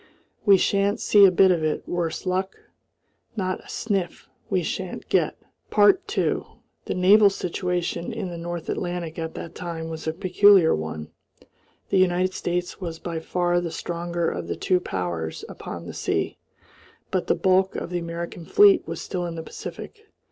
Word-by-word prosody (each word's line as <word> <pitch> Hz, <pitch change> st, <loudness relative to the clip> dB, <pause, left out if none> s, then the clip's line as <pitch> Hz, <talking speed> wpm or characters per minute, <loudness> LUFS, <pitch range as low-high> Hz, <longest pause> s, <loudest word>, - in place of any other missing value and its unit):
We 200 Hz, -1 st, +8 dB
shan't 200 Hz, +2 st, +1 dB
see 205 Hz, -1 st, +6 dB
a 190 Hz, -, +6 dB
bit 190 Hz, +1 st, +5 dB
of 170 Hz, -3 st, +1 dB
it, 155 Hz, -1 st, -1 dB
worse 175 Hz, -1 st, -2 dB
luck! 185 Hz, +1 st, -1 dB, 0.8 s
Not 185 Hz, -3 st, -2 dB
a -, -, -16 dB
sniff 195 Hz, -6 st, -2 dB, 0.2 s
we 185 Hz, -3 st, +1 dB
shan't 185 Hz, +2 st, -4 dB
get!" -, -, +1 dB, 0.4 s
2 205 Hz, -, +3 dB, 0.4 s
The -, -, -2 dB
naval 200 Hz, +3 st, +6 dB
situation 180 Hz, -2 st, -2 dB
in 220 Hz, -5 st, -4 dB
the 170 Hz, -, -6 dB
North 170 Hz, 0 st, -5 dB
Atlantic 175 Hz, -2 st, -3 dB
at 160 Hz, 0 st, -4 dB
that 165 Hz, -, -7 dB
time 165 Hz, -2 st, -5 dB
was 160 Hz, 0 st, -6 dB
a 160 Hz, -, 0 dB
peculiar 185 Hz, 0 st, +5 dB
one. 80 Hz, 0 st, -4 dB, 0.8 s
The 195 Hz, -, +3 dB
United 185 Hz, 0 st, +2 dB
States 175 Hz, +2 st, -3 dB
was 165 Hz, -3 st, -4 dB
by 165 Hz, -1 st, -4 dB
far 175 Hz, +1 st, 0 dB
the 175 Hz, -, -3 dB
stronger 170 Hz, +1 st, -3 dB
of 85 Hz, -1 st, -3 dB
the 85 Hz, -, -2 dB
two 180 Hz, -, +1 dB
powers 85 Hz, -, -4 dB
upon -, -, -8 dB
the -, -, -7 dB
sea, -, -, -2 dB, 0.7 s
but -, -, -1 dB
the -, -, +3 dB
bulk 190 Hz, 0 st, +2 dB
of -, -, -4 dB
the 175 Hz, -, -1 dB
American 170 Hz, 0 st, -6 dB
fleet 405 Hz, -, +5 dB
was -, -, -5 dB
still 180 Hz, -2 st, -3 dB
in 170 Hz, -, -5 dB
the 160 Hz, -, -5 dB
Pacific. 435 Hz, -, -9 dB
175 Hz, 170 wpm, -24 LUFS, 165-190 Hz, 0.8 s, We